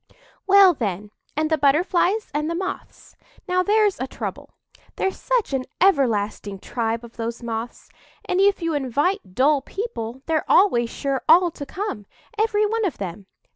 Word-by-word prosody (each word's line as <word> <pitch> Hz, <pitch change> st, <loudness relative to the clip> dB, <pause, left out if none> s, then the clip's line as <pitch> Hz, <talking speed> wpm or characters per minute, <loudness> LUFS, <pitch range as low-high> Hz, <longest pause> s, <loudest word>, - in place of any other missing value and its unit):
"Well, 390 Hz, -2 st, +7 dB
then, 205 Hz, -, -4 dB, 0.3 s
and 310 Hz, +1 st, 0 dB
the 315 Hz, -, +2 dB
Butterflies 355 Hz, +8 st, +2 dB
and 300 Hz, +2 st, -1 dB
the 335 Hz, -, -2 dB
Moths. 380 Hz, +2 st, -6 dB, 0.3 s
Now, 365 Hz, 0 st, +2 dB
there's 415 Hz, +1 st, +2 dB
a 260 Hz, -, -2 dB
trouble. -, -, -6 dB, 0.5 s
There's 385 Hz, -, -2 dB
such -, -, 0 dB
an 260 Hz, -1 st, -1 dB
everlasting 220 Hz, -, +1 dB
tribe 230 Hz, +3 st, -3 dB
of 235 Hz, -, -16 dB
those 230 Hz, +1 st, -4 dB
Moths; 230 Hz, 0 st, -5 dB, 0.4 s
and 365 Hz, +1 st, +1 dB
if 395 Hz, -2 st, +3 dB
you 330 Hz, -1 st, 0 dB
invite 290 Hz, -, -1 dB
dull 280 Hz, +2 st, +3 dB
people 265 Hz, -, -6 dB
they're 320 Hz, -2 st, -1 dB
always 240 Hz, -, +4 dB
sure 275 Hz, +1 st, -2 dB
all 345 Hz, +2 st, +6 dB
to 285 Hz, -3 st, -8 dB
come, 370 Hz, -, -5 dB, 0.3 s
every 425 Hz, -1 st, +2 dB
one 450 Hz, +2 st, -1 dB
of 380 Hz, -, -1 dB
them. 195 Hz, 0 st, -6 dB
305 Hz, 160 wpm, -23 LUFS, 235-385 Hz, 0.5 s, Well